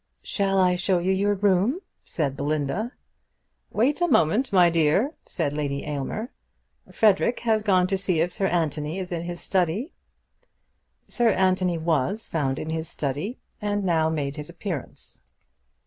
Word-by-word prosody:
"Shall 195 -1 0
I 180 -1 +4
show 190 0 +2
you 180 +2 0
your 200 +2 +2
room?" 200 - +2 0.2
said 140 -5 -2
Belinda. 150 - -2 0.8
"Wait 275 +9 +1
a 350 - +4
moment, 220 - +3
my 180 -3 +6
dear," 165 - +2
said 145 - -1
Lady 140 -2 -2
Aylmer. 150 - -4 0.6
"Frederic 220 +2 +3
has 220 -2 +2
gone 185 -4 +3
to 190 +1 0
see 185 -4 +1
if 170 +2 +1
Sir 195 - 0
Anthony 155 -2 -1
is 185 -2 -5
in 170 -1 -2
his 175 0 -6
study." 190 - 0 1.1
Sir 240 -2 +2
Anthony 185 -3 +2
was 165 +6 0
found 135 -5 -1
in 160 - -4
his 160 0 -3
study, 150 - -3 0.2
and 205 -1 -1
now 165 -3 +2
made 145 -2 -2
his 150 +1 -6
appearance. 170 -4 -6
180 Hz, 150 wpm, -25 LUFS, 155-205 Hz, 1.1 s, my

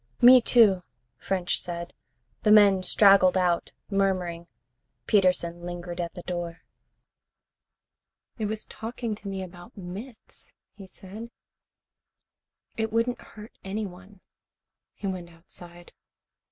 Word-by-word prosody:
"Me, 250 +1 +8
too," 215 -6 +5 0.4
French 185 -2 -1
said. 170 -1 -5 0.5
The 215 - +1
men 200 -3 +6
straggled 195 -1 +5
out, 180 -2 0 0.2
murmuring. 185 -4 -1 0.6
Peterson 180 -4 +2
lingered 175 0 -6
at 170 - -5
the 175 - -8
door. 175 -2 -5 1.8
"It 215 - -1
was 215 +1 -3
talking 230 0 -5
to 205 -1 -9
me 195 -1 -4
about 180 +5 -13
myths," 205 +6 -10 0.2
he 195 -2 -12
said. 200 +5 -10 1.5
"It 220 -1 -1
wouldn't 230 +2 0
hurt 215 +1 -13
anyone." 195 -1 -7 0.7
He - - -9
went 185 -3 -4
outside. 175 +1 -14
190 Hz, 110 wpm, -26 LUFS, 175-215 Hz, 1.8 s, Me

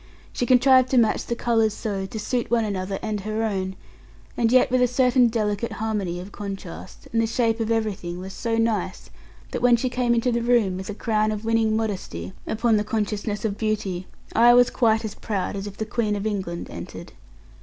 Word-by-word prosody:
She 245 - -1
contrived 255 0 +5
to 260 - +2
match 225 -3 +2
the 235 - -1
colours 225 -3 +1
so, 195 -3 -3
to 220 - -6
suit 240 +2 -2
one 235 -2 +2
another 195 -1 -3
and 215 -1 -2
her 215 +3 -2
own, 190 -3 -2 0.6
and 230 -1 +2
yet 255 0 +4
with 255 0 +3
a 250 - +5
certain 250 0 +4
delicate 215 -1 -1
harmony 205 -5 -2
of 185 +3 -9
contrast, 195 -3 -8
and 225 - +3
the 225 - +1
shape 230 0 +1
of 225 -1 -1
everything 210 -6 -1
was 190 +1 -7
so 230 -1 -2
nice, 225 -1 0
so - - -19 0.4
that - - -3
when 245 -1 +6
she 250 +2 -1
came 245 -1 +1
into 235 +2 +1
the 235 0 0
room, 230 -6 +2
with 190 +1 -6
a 210 - -4
crown 215 -1 +1
of 215 +1 -4
winning 225 -1 +2
modesty 185 - -4
upon 225 0 +2
the 210 - +1
consciousness 210 -1 -2
of 205 -2 -2
beauty, 205 -5 -2 0.3
I 240 +2 +6
was 245 0 +5
quite 225 -2 +2
as 215 - -4
proud 200 -3 -3
as 195 +1 -4
if 200 - -9
the 220 - -2
Queen 215 -1 -1
of 200 +1 -4
England 190 -5 -3
entered. - - -8
220 Hz, 210 wpm, -24 LUFS, 200-235 Hz, 0.6 s, when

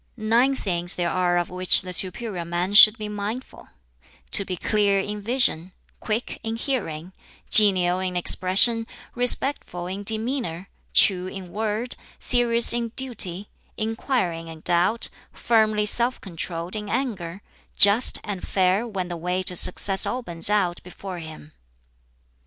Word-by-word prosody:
"Nine 235 +5 +1
things 175 -6 -3
there 175 -1 -2
are 180 -1 0
of 175 0 -3
which 180 0 +3
the 180 0 -6
superior 185 +1 -1
man 175 +3 -4
should 215 +1 +8
be 215 -1 -7
mindful: 210 +5 -7 0.6
to - - +5
be 185 -2 -6
clear 200 0 0
in 205 +2 -5
vision, 200 -7 0 0.3
quick 220 +2 -5
in 225 0 -5
hearing, 190 - -5 0.4
genial 185 -4 +5
in 185 -1 -4
expression, 200 +6 +2 0.3
respectful 245 -7 0
in 190 +3 -6
demeanor, 220 -4 -1 0.3
true 185 -2 +3
in 185 -2 -10
word, 220 +3 -4 0.2
serious 235 -2 +6
in 235 -1 -3
duty, 205 -7 -1 0.3
inquiring 215 -7 -3
in 160 -1 -12
doubt, 180 +8 0 0.2
firmly 215 -2 0
self 240 +4 +3
controlled 170 -1 -7
in 210 -1 -7
anger, 200 -9 -5 0.3
just 205 +5 +5
and 200 -4 -6
fair 190 +4 0
when 190 -5 -5
the 175 - -7
way 180 +2 -3
to 180 - -2
success 190 +2 +3
opens 180 -9 -2
out 195 -4 -1
before 180 0 -10
him." 155 -1 -12
200 Hz, 140 wpm, -22 LUFS, 180-225 Hz, 0.6 s, should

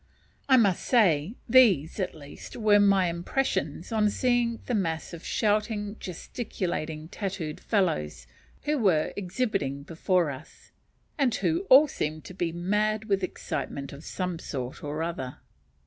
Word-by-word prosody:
I 260 - +7
must 200 -7 +3
say 195 - +3
these, 220 - +5
at 185 -3 -2
least, 145 -2 -11
were 210 -3 +5
my 200 -2 +4
impressions 170 - -2
on 215 -2 +3
seeing 240 0 +1
the 250 - -2
mass 170 -6 -1
of 170 - -8
shouting, 210 -1 0
gesticulating, 170 -5 -4
tattooed 185 -6 -4
fellows, 75 - -1 0.4
who 295 -1 0
were 180 -9 +2
exhibiting 185 - -2
before 170 +1 +1
us, 135 +3 -12 0.5
and 255 -5 +2
who 345 +4 0
all 280 +4 +9
seemed 155 - -4
to - - -9
be 175 -3 -2
mad 210 +5 0
with 200 -2 +1
excitement 140 -6 -4
of 140 +3 -10
some 180 -2 -3
sort 130 -6 -6
or 150 +2 -3
other. 135 -7 -4
185 Hz, 140 wpm, -27 LUFS, 155-215 Hz, 0.5 s, all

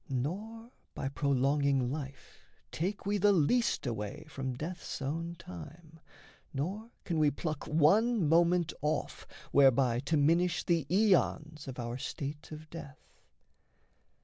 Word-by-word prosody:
Nor 210 - -4 0.2
by 135 - -2
prolonging 140 -1 +1
life 140 -2 -7 0.3
Take 190 +6 -3
we 205 +1 +1
the 205 +2 +5
least 200 +6 +2
away 120 +6 -4
from 130 -4 -4
death's 170 +6 -5
own 165 +5 -3
time, 160 - -11 0.6
Nor 195 +11 -3
can 165 -3 -1
we 150 -1 +5
pluck 155 +1 -4
one 195 +6 +3
moment 170 +1 +3
off, 150 0 -2 0.2
whereby 130 -3 +4
To 150 +4 0
minish 170 +4 +2
the 165 -5 +1
aeons 170 -6 +2
of 130 - -6
our 120 +1 -4
state 145 +3 -5
of 155 0 -9
death. 150 -4 -11
155 Hz, 125 wpm, -31 LUFS, 140-175 Hz, 0.6 s, the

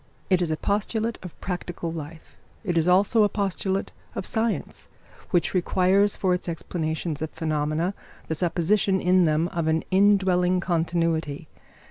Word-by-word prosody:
It 185 -1 +4
is 175 - 0
a 155 - -1
postulate 220 +4 -1
of 180 -3 -10
practical 175 -2 -4
life. 160 0 -9 0.3
It 180 -5 -1
is 165 0 +2
also 195 +5 +4
a 205 - +4
postulate 195 -1 -2 0.2
of - - -3
science, 225 -1 -2 0.4
which 175 -3 +1
requires 190 +2 +2
for 185 -2 +1
its 180 0 -3
explanations 160 -2 -3
of 160 - -2
phenomena 155 +3 -1 0.3
the - - -1
supposition 185 +4 +1
in 180 0 +4
them 155 +1 +2
of 170 -2 -2
an 160 0 +1
indwelling 185 -2 +3
continuity. 165 -3 -1
180 Hz, 145 wpm, -25 LUFS, 160-190 Hz, 0.4 s, It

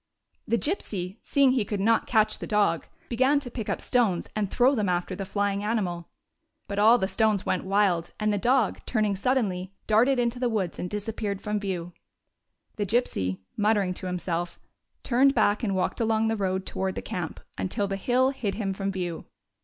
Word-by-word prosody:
The 235 - +2
Gypsy, 205 - -3
seeing 275 -2 +3
he 255 -4 +2
could 205 0 -3
not 225 +3 +2
catch 215 -2 +2
the - - -5
dog, 205 -7 +1 0.2
began 260 +4 +3
to 245 -3 -6
pick 225 -4 -5
up - - -1
stones, 225 -8 +1
and 210 -2 0
throw 255 +6 +4
them 210 -7 0
after 180 +1 -1
the 195 0 -5
flying 200 0 -1
animal. 185 -6 -2 0.6
But 200 0 -3
all 225 +3 +7
the 190 - 0
stones 215 -2 +1
went - - -1
wild, 190 -4 +2
and 215 -1 +1
the 205 - 0
dog, 245 -1 +2
turning 215 -4 +1
suddenly, 195 -5 0
darted 240 +5 +4
into 240 0 0
the 245 -1 +1
woods 200 -6 -2
and 180 - -3
disappeared 210 -1 -3
from 210 0 -2
view. 180 -3 -4 0.8
The 205 - 0
Gypsy, 95 - 0
muttering 205 -3 +2
to 185 - -6
himself, 175 -1 -3 0.4
turned 270 +3 +3
back 210 -2 +3
and 200 -5 0
walked 185 +5 -1
along 220 0 +2
the 225 - +1
road 190 -2 -1
toward 190 0 -2
the - - -5
camp 175 -3 -4 0.2
until 200 +2 -1
the 195 - -2
hill 250 +6 +2
hid 225 -7 -3
him 200 -3 -2
from 195 0 -2
view. 175 -3 -4
205 Hz, 190 wpm, -26 LUFS, 190-230 Hz, 0.8 s, all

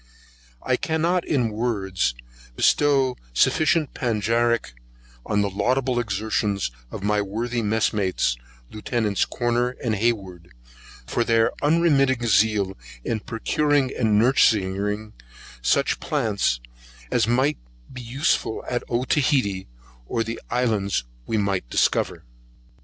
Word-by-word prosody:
I 130 - +1
cannot, 165 +4 0
in 125 -7 +1
words, 100 - -1 0.4
bestow 135 - +3 0.2
sufficient 155 - +2
panegyric 115 - 0 0.5
on 105 0 +1
the 100 - 0
laudable 125 +4 0
exertions 100 - -1 0.2
of - - -7
my 105 0 +2
worthy 115 +4 -2
messmates, 105 - +1 0.4
Lieutenants 105 -2 -1
Corner 120 +1 -1
and 115 -3 0
Hayward, 95 - -2 0.5
for 120 - 0
their 115 -1 +3
unremitting 145 -5 +3
zeal 105 -3 +2 0.3
in 115 - -1
procuring 135 +5 0
and 110 -4 +2
nursing 105 -4 +2 0.5
such - - +1
plants 100 - 0 0.5
as 115 -3 +2
might 130 +5 +2 0.3
be 125 - -7
useful 120 -1 -1
at 120 -1 -1
Otaheitee 125 -5 +1 0.4
or 115 - 0
the 115 +1 -6
islands 110 - 0 0.2
we 110 - 0
might 100 - -1
discover. - - +1
115 Hz, 110 wpm, -23 LUFS, 105-125 Hz, 0.5 s, bestow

